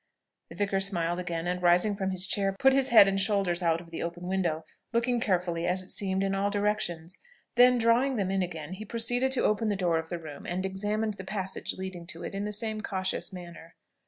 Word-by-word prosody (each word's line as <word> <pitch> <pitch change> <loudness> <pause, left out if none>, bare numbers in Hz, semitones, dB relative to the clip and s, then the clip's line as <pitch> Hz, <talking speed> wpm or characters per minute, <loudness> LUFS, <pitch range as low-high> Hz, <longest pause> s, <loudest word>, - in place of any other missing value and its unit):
The - - -10
vicar 200 -1 0
smiled 175 -3 0
again, 170 -2 -3
and 180 0 -1
rising 180 +4 +4
from 190 -1 -2
his 185 0 0
chair, 195 0 0
put 270 +3 +5
his 270 -1 +2
head 220 -4 +8
and 195 0 +1
shoulders 195 -3 +1
out 165 -1 +2
of 170 -1 -13
the 165 - -5
open 175 +1 -5
window, 170 -4 -1 0.3
looking 240 +1 +1
carefully, 180 -5 0
as 185 +1 0
it 185 - -11
seemed, 190 -1 -1
in 195 0 0
all 195 +1 +1
directions; 200 -5 -2 0.3
then, 250 +1 +6
drawing 240 +4 +3
them 195 -4 0
in 195 0 +1
again, 165 -2 -4
he 200 +3 -7
proceeded 245 +4 0
to 260 - +1
open 215 +1 +2
the 205 - +1
door 175 -4 +1
of 160 0 -7
the 175 - -3
room, 155 -3 -9
and 185 +2 -2
examined 210 +2 -1
the 190 - -7
passage 190 -1 -3
leading 185 -2 -6
to 165 - -7
it - - -5
in 200 +1 -3
the 210 - -3
same 215 +1 -3
cautious 190 -2 -2
manner. 170 -2 -10
190 Hz, 225 wpm, -29 LUFS, 175-210 Hz, 0.3 s, head